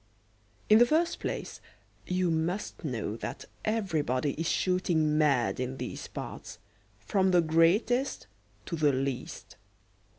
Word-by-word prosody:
In 215 +1 +7
the 240 - +8
first 330 +4 +1
place - - -5 0.5
you 180 -1 +1
must 175 +7 -2
know 120 -7 -3
that - - -6 0.2
everybody 155 - 0
is 165 +1 -2
shooting 170 -4 +1
mad 140 -7 +2
in 130 +1 -3
these - - -6
parts, - - -8 0.4
from 190 - +1
the 180 -1 +5
greatest 175 - +2 0.4
to 170 - -3
the 150 -3 +3
least. 135 -1 -4
165 Hz, 125 wpm, -29 LUFS, 145-190 Hz, 0.5 s, the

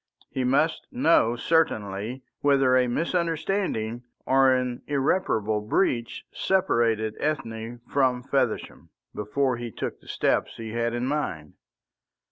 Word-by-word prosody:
He 130 - -1
must 140 +6 +1
know 125 -4 +3
certainly 120 -6 0 0.2
whether 135 -3 +4
a 125 -1 +4
misunderstanding 165 - -1 0.2
or 135 0 +5
an 125 -1 0
irreparable 130 - +1
breach 115 - 0
separated 115 - +1
Ethne 115 -6 -3
from 130 -3 +1
Feversham 130 -4 -1 0.2
before 125 +5 0
he 120 0 -5
took - - -5
the - - -20
steps - - 0
he 115 -1 -6
had 115 +1 -1
in 120 +1 -1
mind. 110 - -3
125 Hz, 115 wpm, -26 LUFS, 115-140 Hz, 0.2 s, or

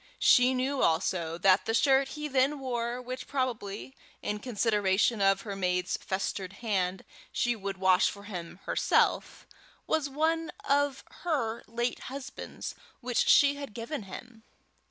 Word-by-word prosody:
She 250 +1 +5
knew 265 +2 0
also 165 0 +1
that 185 +1 +4
the 225 - 0
shirt 270 +2 +4
he 300 0 -3
then 275 +1 +2
wore, 240 -2 -2
which 255 +1 -6
probably, 255 -3 -3 0.3
in 210 0 -2
consideration 210 -2 +1
of 195 0 +4
her 200 -3 -5
maid's 180 -1 0
festered 190 0 -3
hand, 190 -4 -2 0.3
she 240 0 +1
would 200 -2 -5
wash 185 -1 +4
for 200 - -9
him 180 -3 -7
herself, - - +1 0.4
was 315 -3 0
one 325 +3 0 0.2
of 285 -1 +2 0.2
her 260 -10 -1
late 240 +2 -2
husband's 265 0 -7 0.3
which 245 -1 0
she 285 -1 +6
had 280 -7 -8
given 235 +4 -4
him. 225 +4 -10
235 Hz, 140 wpm, -29 LUFS, 195-265 Hz, 0.4 s, she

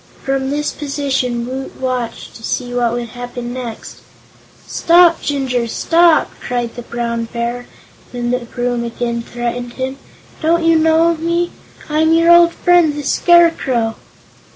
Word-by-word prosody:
From 270 0 -1
this 295 +1 -1
position 270 -5 -2
Woot 260 +2 -6
watched 250 -3 -3
to - - -13
see 245 +2 -3
what 240 -1 +1
would 240 -1 -4
happen 245 0 -7
next. 245 -3 -7 0.7
"Stop, 340 0 +4
Jinjur 260 -4 -1
stop!" 335 +7 +3
cried 240 -1 -3
the 240 - -7
Brown 235 -1 -3
Bear, 235 +1 -4 0.4
when 240 -1 -3
the 250 - +1
broom 245 0 -3
again 235 0 -3
threatened 240 +1 -5
him. 260 +1 -4 0.4
"Don't 335 +1 +2
you 330 -1 +4
know 320 +1 +3
me? 340 +2 -1 0.4
I'm 315 +1 +2
your 335 +1 +5
old 345 0 +6
friend 350 -5 +3
the 295 - -5
Scarecrow?" 280 -9 +3
255 Hz, 140 wpm, -17 LUFS, 240-320 Hz, 0.7 s, old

